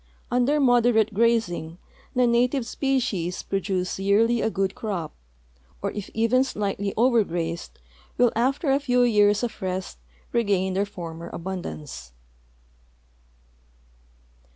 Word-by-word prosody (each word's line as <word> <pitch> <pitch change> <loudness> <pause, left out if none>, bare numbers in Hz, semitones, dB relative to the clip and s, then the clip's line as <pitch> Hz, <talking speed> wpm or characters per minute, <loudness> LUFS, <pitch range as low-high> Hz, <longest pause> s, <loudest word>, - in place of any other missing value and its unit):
Under 250 +5 +2
moderate 240 -4 +3
grazing 205 -7 +1 0.4
the 250 0 +4
native 245 +2 +2
species 235 -10 -1
pi'o 195 0 -2
duee 190 -1 -2
yearly 225 +4 +3
a - - +1
good 195 -2 -1
crop, 185 -8 -4 0.7
or - - -2
if 205 -2 -6
even 230 +3 +3
slightly 200 -5 -2
over 235 -1 +4
grazed 170 -2 -4 0.4
will 245 -1 +4
after 270 +5 +1
a 275 - +3
few 250 -3 +2
years 210 -2 +4
of 235 -3 -4
rest 185 - -4 0.3
regain 200 -5 +1
their 200 +2 0
former 170 -4 -8
abundance. 165 - -6
210 Hz, 120 wpm, -25 LUFS, 185-245 Hz, 0.7 s, the